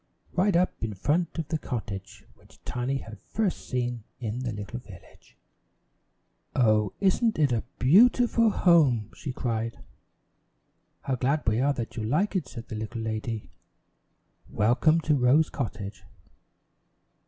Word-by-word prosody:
right 185 Hz, +1 st, +2 dB
up 180 Hz, -6 st, +1 dB
in 110 Hz, -2 st, -3 dB
front 160 Hz, -, 0 dB
of 160 Hz, -3 st, -2 dB
the 160 Hz, -, -1 dB
cottage 105 Hz, -8 st, -6 dB
which -, -, -22 dB
Tiny 125 Hz, +2 st, -1 dB
had 110 Hz, -5 st, -9 dB
first 215 Hz, -5 st, -3 dB
seen 120 Hz, -3 st, -2 dB, 0.2 s
in 115 Hz, 0 st, -3 dB
the 125 Hz, -2 st, -3 dB
little 105 Hz, +3 st, -6 dB
village. 100 Hz, -7 st, -16 dB, 1.2 s
"Oh, 110 Hz, -4 st, +3 dB
isn't 205 Hz, +4 st, +2 dB
it 145 Hz, -4 st, +3 dB
a 115 Hz, -2 st, +1 dB, 0.2 s
beau 185 Hz, -, +7 dB
ti 245 Hz, 0 st, +1 dB
ful 230 Hz, -1 st, +3 dB
home!" 145 Hz, -, +3 dB
she 140 Hz, -, -5 dB
cried. 115 Hz, -2 st, -2 dB, 1.2 s
"How 135 Hz, -, -2 dB
glad 135 Hz, +4 st, 0 dB
we 110 Hz, +1 st, +2 dB
are 140 Hz, +1 st, +3 dB
that 120 Hz, -3 st, -5 dB
you 110 Hz, -, -2 dB
like 155 Hz, -, 0 dB
it," 185 Hz, -, -1 dB
said 115 Hz, -2 st, -9 dB
the -, -, -5 dB
little 110 Hz, +2 st, -5 dB
lady. 110 Hz, -3 st, -4 dB, 1.0 s
"Welcome 125 Hz, +10 st, +3 dB
to 155 Hz, -1 st, +1 dB
Rose 140 Hz, +4 st, +4 dB
Cottage." 105 Hz, -6 st, -5 dB
125 Hz, 145 wpm, -27 LUFS, 110-160 Hz, 1.2 s, beau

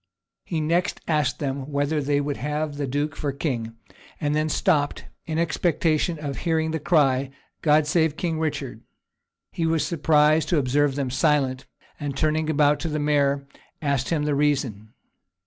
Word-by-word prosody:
He 165 Hz, -3 st, -2 dB
next 170 Hz, +4 st, 0 dB
asked 150 Hz, -5 st, +1 dB
them 140 Hz, 0 st, -4 dB
whether 145 Hz, +2 st, 0 dB
they 145 Hz, +1 st, +1 dB
would 145 Hz, 0 st, -2 dB
have 150 Hz, +1 st, -3 dB
the 145 Hz, -1 st, -2 dB
duke 145 Hz, +3 st, -2 dB
for 145 Hz, -, -2 dB
king; 120 Hz, -6 st, -3 dB, 0.4 s
and 150 Hz, -2 st, 0 dB
then 155 Hz, +1 st, +1 dB
stopped, 150 Hz, -3 st, +1 dB, 0.2 s
in 160 Hz, -1 st, -2 dB
expectation 165 Hz, 0 st, +1 dB
of 145 Hz, -2 st, -5 dB
hearing 160 Hz, -2 st, 0 dB
the 160 Hz, -, -2 dB
cry, 140 Hz, -5 st, +2 dB, 0.3 s
"God 150 Hz, 0 st, +4 dB
save 160 Hz, 0 st, +1 dB
King 165 Hz, -3 st, -2 dB
Richard." 140 Hz, -7 st, -3 dB, 0.7 s
He 165 Hz, -, -1 dB
was 160 Hz, -1 st, +1 dB
surprised 155 Hz, -1 st, +3 dB
to 175 Hz, -, +2 dB
observe 140 Hz, +1 st, +2 dB
them 135 Hz, -3 st, -2 dB
silent; 135 Hz, -2 st, +1 dB, 0.3 s
and 145 Hz, -2 st, -4 dB
turning 155 Hz, +1 st, +1 dB
about 150 Hz, -1 st, +3 dB
to 170 Hz, -, -3 dB
the 155 Hz, -1 st, -2 dB
mayor, 140 Hz, -2 st, +1 dB, 0.3 s
asked 140 Hz, -4 st, -1 dB
him 160 Hz, -3 st, 0 dB
the 150 Hz, 0 st, 0 dB
reason. 130 Hz, -8 st, 0 dB
150 Hz, 165 wpm, -24 LUFS, 140-155 Hz, 0.7 s, God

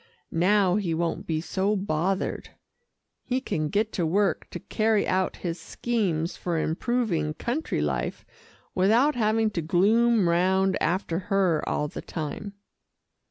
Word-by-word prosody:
Now 185 Hz, +2 st, +3 dB
he 175 Hz, -6 st, -1 dB
won't 170 Hz, 0 st, -2 dB
be 160 Hz, -1 st, 0 dB
so 195 Hz, +4 st, 0 dB
bothered. 190 Hz, 0 st, -1 dB, 0.7 s
He 255 Hz, 0 st, -1 dB
can 155 Hz, -, -2 dB
get 210 Hz, +4 st, 0 dB
to 180 Hz, -, -1 dB
work 190 Hz, +2 st, +1 dB
to -, -, -6 dB
carry 215 Hz, -1 st, +1 dB
out 185 Hz, 0 st, 0 dB
his 170 Hz, 0 st, -2 dB
schemes 185 Hz, -9 st, -1 dB
for 175 Hz, -2 st, -2 dB
improving 165 Hz, -2 st, 0 dB
country 265 Hz, -, -2 dB
life -, -, -2 dB, 0.5 s
without 230 Hz, +10 st, +4 dB
having 220 Hz, -2 st, +1 dB
to 170 Hz, -, -2 dB
gloom 210 Hz, +5 st, +3 dB
round 190 Hz, +2 st, +2 dB
after 170 Hz, 0 st, 0 dB
her 190 Hz, -6 st, +2 dB
all 150 Hz, -, 0 dB
the -, -, -7 dB
time." 170 Hz, +6 st, -5 dB
190 Hz, 135 wpm, -26 LUFS, 170-215 Hz, 0.7 s, without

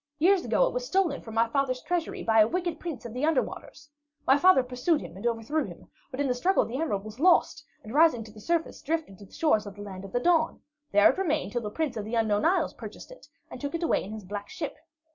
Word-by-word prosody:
"Years 360 Hz, +4 st, +4 dB
ago -, -, +3 dB
it -, -, -2 dB
was -, -, -2 dB
stolen 375 Hz, -, +1 dB
from 225 Hz, -1 st, -9 dB
my 230 Hz, +1 st, +3 dB
father's 255 Hz, +1 st, 0 dB
treasury 350 Hz, -2 st, -2 dB
by 225 Hz, -1 st, +3 dB
a 215 Hz, -, +7 dB
wicked 345 Hz, +2 st, -2 dB
Prince 325 Hz, -9 st, -6 dB
of 230 Hz, -, -7 dB
the 250 Hz, +3 st, -4 dB
Under 310 Hz, -3 st, +3 dB
Waters. 290 Hz, -, -10 dB, 0.4 s
My 265 Hz, -, +6 dB
father 290 Hz, -2 st, +5 dB
pursued 250 Hz, +6 st, 0 dB
him -, -, -9 dB
and 200 Hz, +5 st, -3 dB
overthrew 235 Hz, +7 st, -1 dB
him, -, -, -12 dB, 0.2 s
but 265 Hz, -2 st, -8 dB
in 285 Hz, -, +1 dB
the 250 Hz, -, +2 dB
struggle 360 Hz, +11 st, +2 dB
the 255 Hz, +6 st, -4 dB
emerald 205 Hz, -12 st, -1 dB
was 215 Hz, +3 st, -10 dB
lost, 335 Hz, -3 st, +3 dB, 0.2 s
and 220 Hz, -, -9 dB
rising 300 Hz, -6 st, +4 dB
to 215 Hz, -, -13 dB
the 215 Hz, 0 st, -13 dB
surface, 335 Hz, +3 st, -1 dB
drifted 310 Hz, -, -3 dB
to 200 Hz, -, -12 dB
the -, -, -27 dB
shores 220 Hz, -10 st, +1 dB
of 200 Hz, -, -9 dB
the 205 Hz, -, -8 dB
Land 190 Hz, -2 st, -8 dB
of 195 Hz, -, -9 dB
the 245 Hz, -, 0 dB
Dawn. 325 Hz, +3 st, +2 dB, 0.3 s
There 205 Hz, 0 st, +6 dB
it -, -, -7 dB
remained 315 Hz, -5 st, 0 dB
till 240 Hz, -, -2 dB
the 210 Hz, -, -4 dB
Prince 280 Hz, +1 st, -2 dB
of 210 Hz, -, -4 dB
the 225 Hz, +2 st, -3 dB
Unknown 215 Hz, -1 st, +1 dB
Isles 370 Hz, +3 st, +2 dB
purchased -, -, -10 dB
it -, -, -14 dB, 0.2 s
and -, -, -8 dB
took 285 Hz, +3 st, -3 dB
it 335 Hz, -, -3 dB
away 335 Hz, -, +1 dB
in 195 Hz, -, -8 dB
his 215 Hz, -2 st, -7 dB
black 205 Hz, +1 st, -6 dB
ship. 305 Hz, -, -5 dB
265 Hz, 265 wpm, -27 LUFS, 220-330 Hz, 0.4 s, a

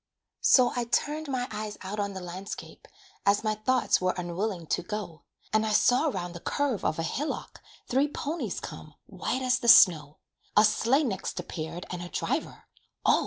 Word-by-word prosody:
So 250 Hz, -2 st, +5 dB
I 245 Hz, -1 st, -1 dB
turned 300 Hz, +6 st, -1 dB
my 255 Hz, -2 st, -2 dB
eyes 210 Hz, -1 st, -5 dB
out 200 Hz, +3 st, -5 dB
on 200 Hz, -1 st, -2 dB
the 190 Hz, -, -6 dB
landscape, 180 Hz, +3 st, -8 dB, 0.4 s
As 200 Hz, +2 st, +3 dB
my 215 Hz, -1 st, +1 dB
thoughts 235 Hz, +2 st, +1 dB
were 185 Hz, 0 st, +1 dB
unwilling 180 Hz, +1 st, -3 dB
to -, -, 0 dB
go, 195 Hz, -4 st, -6 dB, 0.3 s
And 215 Hz, 0 st, +3 dB
I 215 Hz, -1 st, 0 dB
saw 250 Hz, +7 st, +4 dB
'round 175 Hz, -, -3 dB
the 170 Hz, -, -8 dB
curve 275 Hz, +2 st, -1 dB
of -, -, 0 dB
a 165 Hz, -, -1 dB
hillock 285 Hz, -, -4 dB, 0.3 s
Three 270 Hz, +4 st, +2 dB
ponies 300 Hz, +3 st, -4 dB
come, -, -, -9 dB
white 260 Hz, -, -3 dB
as 255 Hz, 0 st, +2 dB
the 240 Hz, -, -4 dB
snow; 160 Hz, -11 st, +7 dB, 0.4 s
A 210 Hz, -, +8 dB
sleigh 240 Hz, +7 st, +3 dB
next 215 Hz, -9 st, -3 dB
appeared 165 Hz, +1 st, -6 dB
and 180 Hz, -1 st, -4 dB
a 175 Hz, -, -7 dB
driver, -, -, -3 dB, 0.4 s
Oh! -, -, +5 dB
210 Hz, 180 wpm, -28 LUFS, 180-250 Hz, 0.4 s, A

